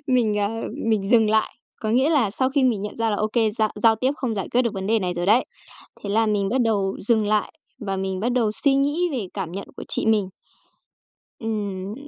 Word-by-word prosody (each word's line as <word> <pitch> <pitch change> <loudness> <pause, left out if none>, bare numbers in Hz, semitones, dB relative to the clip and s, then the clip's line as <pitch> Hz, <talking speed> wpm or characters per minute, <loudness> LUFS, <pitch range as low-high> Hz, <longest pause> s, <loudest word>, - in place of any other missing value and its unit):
mình, 235 -5 +2
ờ, 205 0 +1 0.4
mình 210 -2 0
dừng 225 -3 +5
lại. 220 0 +2 0.3
Có 215 - -2
nghĩa 260 +7 +3
là 255 -10 +2
sau 260 +5 0
khi 280 0 +1
mình 235 -6 +2
nhận 210 +1 -6
ra 225 -1 0
là 205 - 0
ô 215 - 0
kê, 225 -3 +2
giao 215 0 0
giao 225 -1 +5
tiếp 260 +5 +1
không 245 -7 -2
giải 195 - -3
quyết 250 +1 +2
được 235 -4 -2
vấn 190 0 -4
đề 225 +1 +3
này 180 -3 -2
rồi 175 0 -2
đấy. 225 +6 +4 0.6
Thế 200 - -4
là 225 +2 +2
mình 205 -2 +1
bắt 255 +4 +1
đầu 200 -4 +1
dừng 220 -2 +3
lại 210 0 0 0.3
và 195 -5 -3
mình 190 -1 -3
bắt 240 +4 0
đầu 235 -4 +2
suy 270 +5 +1
nghĩ 290 +6 +1
về 235 -7 -2
cảm 165 - -4
nhận 195 +2 -6
của - - -7
chị - - -2
mình. 215 -4 +2 1.1
Ừm, 205 -3 -3
220 Hz, 240 wpm, -23 LUFS, 200-240 Hz, 1.1 s, dừng